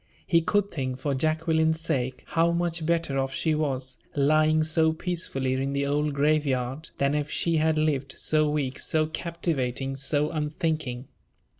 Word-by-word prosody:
He 170 Hz, -1 st, +3 dB
could 205 Hz, +4 st, +1 dB
think, 130 Hz, -4 st, -3 dB
for 140 Hz, +1 st, -2 dB
Jacqueline's 160 Hz, +2 st, +1 dB
sake, 130 Hz, -5 st, -2 dB
how 165 Hz, +1 st, +3 dB
much 170 Hz, -1 st, -1 dB
better 165 Hz, -5 st, +1 dB
off 135 Hz, 0 st, -1 dB
she 160 Hz, -, +1 dB
was, 135 Hz, -4 st, -2 dB, 0.2 s
lying 155 Hz, +2 st, +3 dB
so 160 Hz, 0 st, +2 dB
peacefully 160 Hz, -6 st, -2 dB
in 135 Hz, +1 st, -1 dB
the 140 Hz, 0 st, 0 dB
old 145 Hz, +1 st, 0 dB
grave 150 Hz, +2 st, +3 dB
yard, 130 Hz, +3 st, -2 dB
than 140 Hz, +1 st, +1 dB
if 150 Hz, 0 st, -1 dB
she 165 Hz, -1 st, +1 dB
had 155 Hz, 0 st, +2 dB
lived, 140 Hz, -3 st, 0 dB
so 155 Hz, -1 st, +2 dB
weak, 140 Hz, -3 st, -2 dB
so 155 Hz, -1 st, +2 dB
captivating, 150 Hz, -6 st, -2 dB
so 145 Hz, +2 st, +1 dB
unthinking. 150 Hz, -4 st, -2 dB
150 Hz, 160 wpm, -26 LUFS, 135-160 Hz, 0.2 s, He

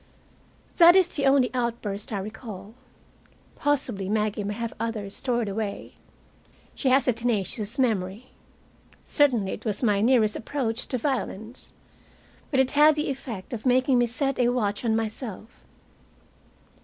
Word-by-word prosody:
That 345 Hz, +1 st, +9 dB
is 375 Hz, -2 st, +5 dB
the 280 Hz, -4 st, 0 dB
only 270 Hz, -3 st, +4 dB
outburst 230 Hz, -5 st, -3 dB
I 210 Hz, -, -1 dB
recall. 210 Hz, 0 st, -8 dB, 0.8 s
Possibly 250 Hz, -10 st, 0 dB
Maggie 210 Hz, 0 st, 0 dB
may 205 Hz, +1 st, -3 dB
have 230 Hz, 0 st, -4 dB
others 215 Hz, -4 st, -3 dB
stored 240 Hz, -4 st, -1 dB
away. 200 Hz, 0 st, -4 dB, 0.8 s
She 265 Hz, -, 0 dB
has 265 Hz, +2 st, +3 dB
a 250 Hz, -, +4 dB
tenacious 225 Hz, 0 st, -1 dB
memory. 220 Hz, -2 st, -1 dB, 0.7 s
Certainly 245 Hz, -10 st, +2 dB
it -, -, -6 dB
was 215 Hz, +1 st, -3 dB
my 205 Hz, -3 st, +2 dB
nearest 225 Hz, -2 st, +3 dB
approach 235 Hz, -2 st, -3 dB
to 255 Hz, -, -1 dB
violence. 240 Hz, -3 st, -4 dB, 0.8 s
But 270 Hz, -, +1 dB
it 265 Hz, 0 st, +3 dB
had 300 Hz, +1 st, +6 dB
the 300 Hz, -2 st, -1 dB
effect 240 Hz, -6 st, -7 dB
of 220 Hz, -, -5 dB
making 255 Hz, 0 st, +3 dB
me 240 Hz, -, +3 dB
set 270 Hz, +3 st, -1 dB
a 245 Hz, -1 st, +3 dB
watch 215 Hz, -4 st, -1 dB
on 225 Hz, -2 st, +1 dB
myself. 225 Hz, 0 st, -5 dB
235 Hz, 145 wpm, -25 LUFS, 210-260 Hz, 0.8 s, That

